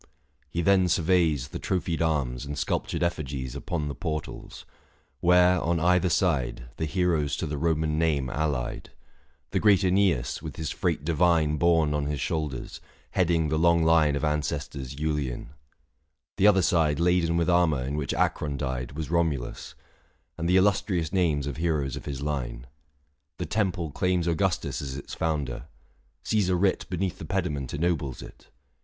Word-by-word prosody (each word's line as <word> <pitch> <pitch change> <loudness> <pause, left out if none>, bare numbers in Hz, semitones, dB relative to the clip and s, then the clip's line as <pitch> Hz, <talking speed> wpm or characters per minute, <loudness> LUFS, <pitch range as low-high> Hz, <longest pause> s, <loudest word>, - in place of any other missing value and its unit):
He 85 +5 -2
then 95 +1 +4
surveys 80 -6 +2
The - - -6
trophied 85 -4 -1
arms, 70 -7 0
and 70 0 -5
sculptured - - -1
effigies, 70 -7 -3
Upon 80 -4 -3
the 70 - -3
portals; 75 +3 -6 0.5
where, 90 +1 +4
on 85 0 0
either 90 +2 +3
side, 75 -10 +1
635 - - -30
The 80 - -1
heroes 80 -3 +1
to 85 - -3
the 75 -1 -3
Koman 80 0 0
name 75 -5 +1
allied 70 -3 -2 0.3
— - - -40
The - - +1
great 105 -3 +5
iEneas, 90 -10 +1
with - - -7
his 80 -3 -4
freight 70 - -1
divine 80 -2 +2
Borne 80 -2 +3
on 75 -1 -1
his 75 -1 -2
shoulders, 75 -3 -3 0.3
heading 85 -4 +2
the 80 +1 0
long 85 0 +4
line 80 -3 +4
Of 70 - -3
ancestors 75 -3 -2
Iiilean: 75 -4 -2 0.9
the 100 +1 +5
other 95 -3 +5
side 80 -4 +2
Laden 85 -1 +2
with 85 - +1
armour 85 -7 +3
in 70 +3 -3
which 75 -3 -2
Acron 75 -2 0
died, 65 -2 -3
640 - - -8
Was 80 0 -4
Romulus; 80 -7 -1 0.6
and 85 0 -2
the 90 - +5
illustrious 95 -4 +1
names 80 -7 +1
Of 70 0 -4
heroes 75 -5 -1
of - - -8
his 70 -1 -5
line. 65 -5 -3 0.7
The 90 - -3
temple 90 -3 -1
claims 90 +2 0
Augustus 85 +1 0
as 70 -1 -5
its 70 - -8
founder; 75 -6 -2 0.6
Caesar 95 -4 +1
writ 95 +1 +1
Beneath 90 0 -2
the - - -6
pediment 80 -8 -2
ennobles 75 -5 -1
it. - - -14
80 Hz, 165 wpm, -27 LUFS, 70-90 Hz, 0.9 s, great